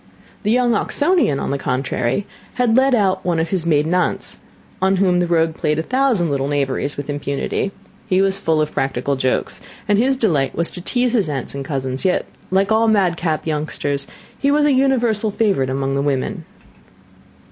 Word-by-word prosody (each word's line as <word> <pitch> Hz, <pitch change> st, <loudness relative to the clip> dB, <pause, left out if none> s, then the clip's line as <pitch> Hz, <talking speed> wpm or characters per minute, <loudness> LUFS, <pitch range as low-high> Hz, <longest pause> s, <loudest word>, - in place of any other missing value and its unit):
The 210 Hz, -, -1 dB
young 245 Hz, +1 st, +3 dB
Oxonian, 290 Hz, -, +2 dB
on -, -, -2 dB
the 140 Hz, -, -2 dB
contrary, 130 Hz, +7 st, -1 dB, 0.3 s
had 245 Hz, -3 st, +2 dB
led 265 Hz, 0 st, +4 dB
out 195 Hz, -4 st, +1 dB
one 175 Hz, -2 st, 0 dB
of 165 Hz, 0 st, -2 dB
his 180 Hz, -4 st, 0 dB
maiden 155 Hz, +1 st, +2 dB
aunts, 180 Hz, 0 st, -1 dB, 0.4 s
on 190 Hz, +1 st, +3 dB
whom 185 Hz, -2 st, +2 dB
the 175 Hz, -, +1 dB
rogue 165 Hz, -1 st, +2 dB
played 150 Hz, -1 st, -1 dB
a 160 Hz, -, -1 dB
thousand 250 Hz, -, +1 dB
little 135 Hz, -1 st, -1 dB
knaveries 140 Hz, 0 st, -1 dB
with 145 Hz, -, -5 dB
impunity; 145 Hz, +6 st, -2 dB, 0.4 s
he 185 Hz, -, +2 dB
was 195 Hz, 0 st, +1 dB
full 160 Hz, -4 st, +1 dB
of 150 Hz, -, -1 dB
practical 135 Hz, +1 st, -1 dB
jokes, 130 Hz, -1 st, -1 dB, 0.3 s
and 205 Hz, 0 st, +3 dB
his 265 Hz, +3 st, +2 dB
delight 160 Hz, -, +1 dB
was 170 Hz, 0 st, 0 dB
to 180 Hz, -, -7 dB
tease 245 Hz, +5 st, 0 dB
his 210 Hz, -9 st, +1 dB
aunts 135 Hz, -4 st, -4 dB
and 140 Hz, 0 st, -4 dB
cousins; 130 Hz, -2 st, -3 dB
yet, 185 Hz, -, +1 dB, 0.2 s
like 195 Hz, +3 st, +1 dB
all 225 Hz, +1 st, +3 dB
madcap 175 Hz, -6 st, +1 dB
youngsters, 150 Hz, -2 st, -2 dB, 0.3 s
he 280 Hz, -, +1 dB
was 295 Hz, +1 st, +3 dB
a 295 Hz, -, +4 dB
universal 240 Hz, -5 st, +2 dB
favourite 195 Hz, -, +1 dB
among 135 Hz, +1 st, -1 dB
the 140 Hz, -, 0 dB
women. 140 Hz, -2 st, -2 dB
175 Hz, 185 wpm, -19 LUFS, 140-220 Hz, 0.4 s, led